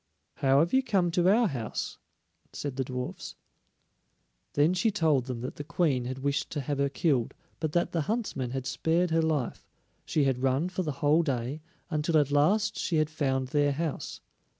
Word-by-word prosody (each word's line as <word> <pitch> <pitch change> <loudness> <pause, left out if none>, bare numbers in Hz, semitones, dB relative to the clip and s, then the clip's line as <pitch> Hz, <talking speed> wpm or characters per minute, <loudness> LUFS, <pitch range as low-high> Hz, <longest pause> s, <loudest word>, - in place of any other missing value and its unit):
"How 135 -2 +3
have 170 - 0
you 265 - +5
come 195 -9 +1
to 175 +1 +3
our 225 +3 +4
house?" 120 - -4 0.5
said 145 -3 -4
the 135 - 0
dwarfs. 125 0 -5 1.2
Then 150 +5 +3
she 185 +5 +2
told 160 - +2
them 125 -3 -5
that 125 - -6
the 145 - -4
Queen 140 -6 0
had 130 +1 -4
wished 140 0 0
to 145 - -2
have 140 +1 -3
her 140 0 +2
killed, 135 -4 0 0.2
but 155 -2 -2
that 175 0 +1
the 165 - 0
huntsman 180 - -2
had 130 +1 -4
spared 165 +5 +1
her 165 0 +3
life; 155 -6 -1 0.4
she 150 - +1
had 130 -2 +1
run 135 +6 +1
for 185 0 -2
the 155 -4 -2
whole 155 +3 +5
day, 135 -1 -2 0.3
until 155 +1 +1
at 145 -2 +2
last 160 +10 +2
she 170 - -1
had 155 0 +2
found 135 -4 -1
their 145 0 +2
house. 155 0 -4
150 Hz, 190 wpm, -29 LUFS, 135-170 Hz, 1.2 s, you